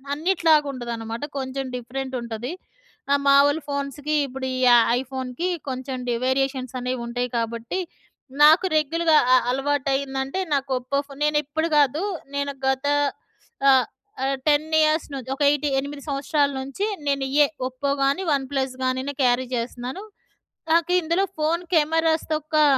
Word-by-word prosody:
అన్నిటిలాగా 320 -2 +3
ఉండదనమాట. 235 -1 -5 0.2
కొంచెం 265 0 -4
డిఫరెంట్ 260 +2 -6
ఉంటది. 235 +3 -5 0.6
ఆహ్, 280 - +4
మామూలు 285 +3 +5
ఫోన్స్‌కి 280 +1 -2
ఇప్పుడు 265 0 -6
ఈ - - -2
య - - +7 0.3
ఐఫోన్‌కి 260 +4 -4 0.2
కొంచెం 260 0 -4
డి 240 - +1
వేరియేషన్స్ 260 -1 -1
అనేవి 250 0 -3
ఉంటాయి 245 +1 -2
కాబట్టి, 230 +7 -3 0.6
నాకు 315 +5 +7
రెగ్యుల్‌గా 320 +2 +2 0.2
అ - - +7
అలవాటయిందంటే, 270 +2 -1
నాకు 275 -1 0
ఒప్పో 255 +3 -2
ఫోన్. 280 0 -12
నేను 300 0 +2
ఇప్పుడు 315 +3 -2
కాదు. 290 +4 +3 0.3
నేను 280 0 -1
గత 265 +1 0 0.8
ఆహ్, 260 -3 +5 0.4
ఆహ్, 270 0 0
10 300 +1 +3
ఇయర్స్ 310 +1 +2
నుంచి 265 -1 -6
ఒక 290 - -1
ఎయిట్ 295 0 +1
8 280 +1 -6
సంవత్సరాల 285 +1 +1
నుంచి 275 +10 -3 0.2
నేను 275 -1 +1
ఇయ్యే. 290 +2 +4 0.2
ఒప్పో 275 +2 -2
కాని, 280 +8 +1
వన్ 275 -2 +1
ప్లస్‌ 265 -2 -1
గాని 255 0 0 0.2
క్యారీ 250 +1 +2
చేస్తున్నాను. 245 - -4 0.7
నాకు 340 +1 +3
ఇందులో 335 +4 +1
ఫోన్ 325 +3 0
కెమెరాస్ 320 +1 +2
తొక్కా, 310 0 +1
275 Hz, 140 wpm, -23 LUFS, 260-300 Hz, 0.8 s, య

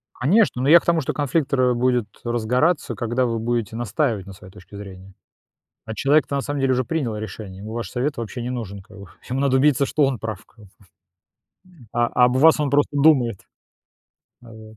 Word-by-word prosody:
Конечно, 150 - +2
но 135 - 0
я 170 +2 +8
к - - -19
тому, 170 -1 +2
что 135 - -3
конфликт 145 0 -1
ра 125 -2 +2
будет 125 -2 +1 0.2
разгораться, 125 +8 0
когда 120 +2 -1
вы 115 -1 -2
будете 115 -1 -2
настаивать 115 -3 -1
на 100 - -9
своей 95 0 -14
точке 105 0 -14
зрения. 95 -1 -11 0.7
А 110 0 -6
человек-то 145 +2 +2
на - - 0
самом 145 0 -3
деле 135 -1 +2
уже 130 0 0
принял 135 -9 -2
решение, 105 -2 -8
ему 110 +2 -8
ваш 115 -4 -5
совет 140 +4 -2
вообще 120 +1 -6
не 120 - -4
нужен 100 -6 -6
как 105 - -17
бы. 100 - -11 0.2
Ему 130 +2 -2
надо 135 -1 +2
убедиться, 140 0 +3
что 150 - +1
он 135 -4 0
прав 110 -2 -6
как 115 - -24
бы. 95 - -23 1.0
М, 130 -10 -19
а 120 0 +2 0.2
об 125 +1 +2
вас 160 +3 +5
он 145 -3 -1
просто 145 0 +1
думает. 135 -8 +3 1.0
Вот. 110 -2 -14
125 Hz, 205 wpm, -22 LUFS, 110-140 Hz, 1.0 s, я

